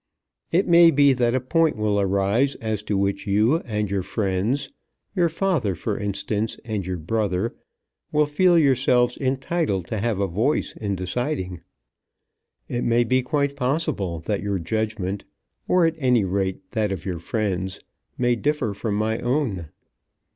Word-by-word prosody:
It 180 +4 +2
may 170 -1 +7
be 140 -2 +5
that 120 -1 +1
a - - +2
point 160 +4 +1
will 105 -1 +1
arise 100 +8 +1
as 110 -2 -3
to 105 -1 -1
which 100 +1 -1
you 105 +9 +3
and 105 - -3
your 100 -1 0
friends, 105 +8 -1 0.4
your 175 -3 +3
father, 160 - 0
for 105 +5 -3
instance, 105 +2 -2
and 105 -5 -3
your 90 -1 -2
brother, 100 +4 -1 0.6
will 150 0 +3
feel 175 +4 +3
yourselves 125 -4 +3
entitled 135 - -1
to 110 - -2
have 110 -2 -1
a 100 - +2
voice 110 - 0
in 100 -2 -2
deciding. 95 - -3 1.1
It 120 - -2
may 120 +1 +3
be 130 +2 +2
quite 140 +1 0
possible 125 - -1
that 100 +4 -2
your 100 -1 -1
judgment, 100 +1 -2 0.4
or, 180 -2 +4
at 165 - +2
any 125 -6 +3
rate, 95 0 -2
that 110 -3 0
of 95 -4 -4
your 90 -3 -3
friends, 95 -1 -2 0.4
may 120 -1 +2
differ 140 -4 -1
from 100 +1 -2
my 110 +2 0
own. 120 - -1
110 Hz, 155 wpm, -23 LUFS, 100-135 Hz, 1.1 s, may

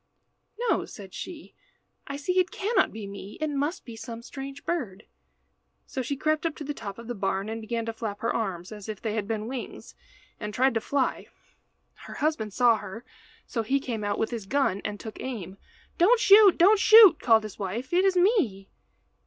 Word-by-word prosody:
"No," - - +1
said 195 -3 -11
she, 335 -4 -8 0.5
"I 280 - -4
see 365 +6 0
it 365 0 +2
cannot 425 +4 +1
be 220 -2 -7
me. 200 0 -9
It 310 -1 -1
must 290 +5 -2
be 235 -3 -9
some 230 0 -8
strange 275 +2 -8
bird." 240 - -3 0.8
So 260 - -4
she 270 +3 -3
crept 310 +2 0
up 330 -2 -1
to - - -7
the 295 +1 -4
top 200 -7 -7
of 235 - -10
the 245 - -3
barn, 195 -1 -2
and 225 0 -4
began 230 +1 -3
to 225 - -3
flap 215 -3 -5
her 230 - -1
arms 190 -5 -3
as 210 0 -9
if 215 - -5
they 220 -2 -3
had 210 -2 -2
been 215 -1 -2
wings, 255 0 -7 0.5
and 210 -1 -5
tried 260 +1 +3
to 225 - 0
fly. 280 +2 -1 0.7
Her - - -11
husband 290 -9 -1
saw 235 +1 +4
her, 210 +3 -9 0.4
so 230 - -2
he 265 +6 +1
came 235 -5 -4
out 205 0 -1
with 225 - -1
his 225 -5 -5
gun 265 -6 +1
and 205 - -4
took 220 - -8
aim. 200 -7 -6 0.4
"Don't 445 +8 +5
shoot, 405 -2 +7
don't 400 +5 +6
shoot," 425 -6 +8
called 225 -2 +4
his 215 -2 -9
wife. 220 - -4
"It 365 +2 +4
is 385 -1 +3
me." 350 - +1
235 Hz, 200 wpm, -27 LUFS, 210-300 Hz, 0.8 s, shoot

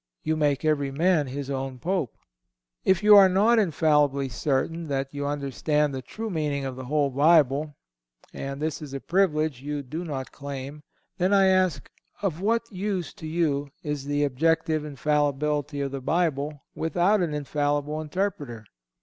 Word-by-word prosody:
You 160 - 0
make 150 -1 +1
every 145 -3 +1
man 155 +1 +2
his 140 +1 -5
own 135 -1 -3
Pope. 175 -2 -2 0.7
If 190 +1 +2
you 210 0 +8
are 195 -2 +8
not 215 +5 +4
infallibly 150 -6 +2
certain 150 +6 -1
that 135 -1 -2
you 145 0 -3
understand 145 +1 0
the 130 - -4
true 220 - -6
meaning 150 -4 -1
of 130 -1 -4
the 130 0 -7
whole 145 +1 +1
Bible—and 135 - 0
this 155 0 -3
is 140 -3 -7
a - - -3
privilege 155 -6 +1
you 145 0 -4
do 155 +7 -5
not 135 -6 -5
claim—then, 140 +7 -5
I 195 -1 +5
ask, 185 -7 +1 0.4
of 175 -4 -1
what 230 +3 +1
use 190 -2 -3
to 160 - -9
you 150 -4 0
is 150 -2 -3
the 145 0 0
objective 155 +3 +1
infallibility 145 0 -1
of 140 -1 -2
the 135 -1 -5
Bible 150 -2 -1
without 175 +6 +1
an 160 -4 -1
infallible 145 +1 -1
interpreter? 150 - -3
150 Hz, 155 wpm, -26 LUFS, 140-165 Hz, 0.7 s, you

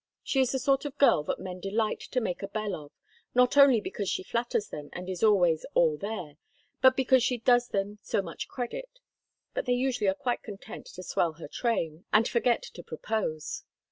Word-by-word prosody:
She 270 - 0
is 255 - +2
the 265 - 0
sort 270 +1 +2
of 290 0 -5
girl 275 - +5
that - - -1
men 185 -1 -6
delight 215 +4 -1
to 255 - -2
make 195 -7 -3
a 195 - -3
belle 210 0 -3
of, 150 -4 -7 0.4
not 250 +1 +4
only 275 -4 +7
because 205 -1 -4
she - - -1
flatters 230 -1 -1
them 145 -1 -7
and 180 +1 -6
is 185 -2 -4
always 180 -7 +4
'all 160 -3 +4
there,' 180 -5 -5 0.4
but 260 0 +6
because 260 -1 +4
she 250 0 +1
does 245 +1 +3
them 205 0 -2
so 200 - -1
much 165 -3 -6
credit. - - -6 0.6
But - - -3
they 250 - +3
usually 245 -4 0
are 190 - +3
quite 245 +4 -2
content 220 +2 -9
to 185 - -9
swell 170 -2 0
her 160 0 -9
train, 165 - -2
and 220 +2 +5
forget 240 - +2
to - - -9
propose. 155 -9 -3
215 Hz, 205 wpm, -29 LUFS, 180-250 Hz, 0.6 s, only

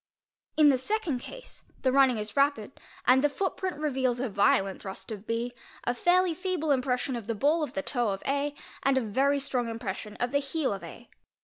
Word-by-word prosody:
In 305 -2 +7
the 265 -2 +3
second 360 - -1
case - - -8 0.2
the 260 - +3
running 265 -3 +5
is 210 0 -5
rapid 275 -5 +1 0.3
and 260 +2 +5
the 295 - +4
footprint 375 +1 -2
reveals 260 -5 0
a 255 -1 -1
violent 195 -1 +2
thrust 190 +3 -8
of 210 0 -7
B, 235 +2 -1 0.3
¢ 245 - +2
fairly 355 +5 +3
feeble 360 -3 -1
impression 255 -1 +1
of 230 -3 -6
the 230 - -1
ball 295 +9 +2
of 295 -3 -3
the 285 - -1
toe 245 -5 0
of 195 -1 -3
A, 285 +1 0 0.3
and 270 -1 +3
a - - +3
very 270 +6 +2
strong 255 -4 -1
impression 215 -2 -5
of 245 0 -2
the 285 - +3
heel 280 -2 -1
of 195 - -7
A. - - -10
265 Hz, 205 wpm, -28 LUFS, 230-290 Hz, 0.3 s, In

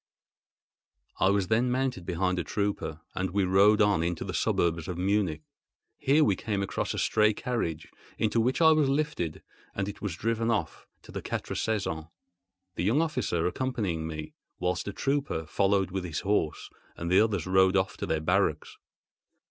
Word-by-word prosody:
I 95 - +4
was 100 -2 +1
then 115 +3 +2
mounted 125 -8 -1
behind 90 0 0
a - - -1
trooper, 100 -4 -2
and 95 0 -2
we 100 +2 +1
rode 100 +3 +5
on 100 -5 +3
into 85 0 -2
the - - -5
suburbs 85 -1 0
of 90 -2 -4
Munich. 95 -4 0 0.6
Here 145 +4 +4
we 100 -9 +3
came 100 0 -2
across 100 - -2
a - - -5
stray 110 -1 +3
carriage, 95 - -3 0.3
into 115 +1 +1
which 125 +7 0
I 160 -1 +7
was 155 -3 +3
lifted, 140 - -1 0.3
and 100 0 -1
it 105 - -7
was 100 -5 -3
driven 115 +4 -1
off 115 -2 -2 0.2
to - - -13
the - - -5
Quatre - - -4
Saisons—the 90 -1 -5
young 110 +10 +3
officer 155 - 0
accompanying 95 -7 -2
me, 75 -1 -6 0.2
whilst 90 +2 -1
a - - -2
trooper 135 - -1
followed 95 +2 +1
with 95 0 -3
his 80 -3 -3
horse, 95 -6 -1 0.3
and 85 +1 -3
the 95 - +6
others 105 -7 0
rode 95 +1 +4
off 95 0 0
to - - -4
their 80 -1 0
barracks. 80 - 0
95 Hz, 170 wpm, -28 LUFS, 85-110 Hz, 0.6 s, I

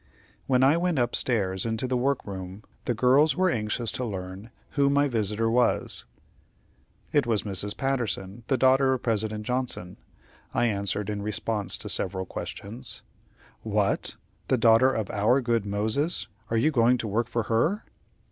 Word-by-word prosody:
When 130 -1 +3
I 140 +5 +5
went 175 -2 0
up 120 -2 +1
stairs 95 -6 +1
into 110 +1 -1
the 130 - 0
work 135 +2 0
room, 95 +1 -7 0.2
the 120 - 0
girls 135 +5 +4
were 185 +1 +2
anxious 110 0 -1
to 130 - -3
learn 95 -1 -6 0.2
who 140 -1 +2
my 145 +1 +3
visitor 110 -2 0
was. 120 +1 +1 1.1
"It 145 -4 +2
was 110 -3 +1
Mrs. 100 0 -1
Patterson, 120 -6 -2
the 135 - +2
daughter 130 +1 +4
of 130 - -3
President 110 -2 0
Johnson," 125 -8 -3 0.6
I - - +3
answered, 100 -1 -1
in 105 -1 -3
response 105 0 -1
to - - -8
several 95 0 -2
questions. 115 +7 -7 0.6
"What! - - 0 0.3
the 130 - +2
daughter 115 +3 +5
of 110 -6 -3
our 110 +6 +3
good 115 -4 0
Moses. 110 - 0 0.2
Are 115 - +1
you 150 +8 +3
going 125 -2 +4
to 115 - -4
work 115 +3 0
for 115 -1 -1
her?" 135 - 0
115 Hz, 160 wpm, -26 LUFS, 105-130 Hz, 1.1 s, I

